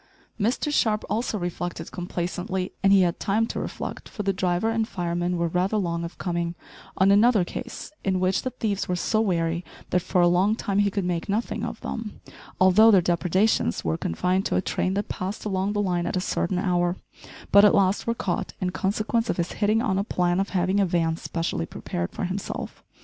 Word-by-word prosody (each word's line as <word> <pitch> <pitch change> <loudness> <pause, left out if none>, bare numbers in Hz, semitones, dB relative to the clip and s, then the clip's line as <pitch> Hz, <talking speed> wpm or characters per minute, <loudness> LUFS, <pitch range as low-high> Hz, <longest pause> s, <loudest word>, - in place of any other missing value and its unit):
Mr 245 +7 0
Sharp 215 -6 +2
also 225 0 -1
reflected 175 -2 -4
complacently 180 +1 -3
and 195 - +4
he 195 -1 +7
had 175 -1 0
time 215 +3 +1
to - - -4
reflect, - - -6
for 210 - -5
the 195 0 +1
driver 185 +3 0
and 225 -1 0
fireman 175 -1 -2
were 170 0 +1
rather 180 +5 0
long 170 -4 -1
of 170 - -7
coming 170 -1 -2 0.4
on 190 +1 +5
another 210 -1 +5
case 240 +9 -7
in 190 -1 +1
which 185 +1 +1
the 255 - -2
thieves 210 -5 -2
were 180 - +1
so 215 +5 +1
wary 170 -4 0 0.3
that 180 - +2
for 180 - 0
a 175 - +6
long 185 +5 +3
time 200 -3 -1
he 205 0 +3
could 195 -1 -2
make 175 +1 -2
nothing 215 +4 -1
of - - -4
them, 225 -2 -5 0.4
although 190 +4 +7
their 200 -4 +7
depredations 180 - +1
were 80 -1 +1
confined 180 - 0
to - - -1
a - - +3
train 185 0 -1
that 205 - -1
passed 190 +4 -4
along 195 0 0
the 205 - 0
line 175 -3 0
at - - -1
a - - +2
certain 180 0 -1
hour, 175 -1 +1 0.6
but 200 0 +8
at 210 - +6
last 195 +2 +2
were 230 - +1
caught 185 -5 -2
in 180 -1 -1
consequence 215 +5 -1
of - - 0
his 170 0 -1
hitting 215 +2 +1
on 195 -6 +1
a - - +1
plan 180 -3 0
of 195 - -1
having 185 +1 +1
a 200 - +4
van 165 -2 +1
specially 165 - -3
prepared 85 0 -4
for - - -5
himself. 185 +2 -5
185 Hz, 210 wpm, -25 LUFS, 175-205 Hz, 0.6 s, but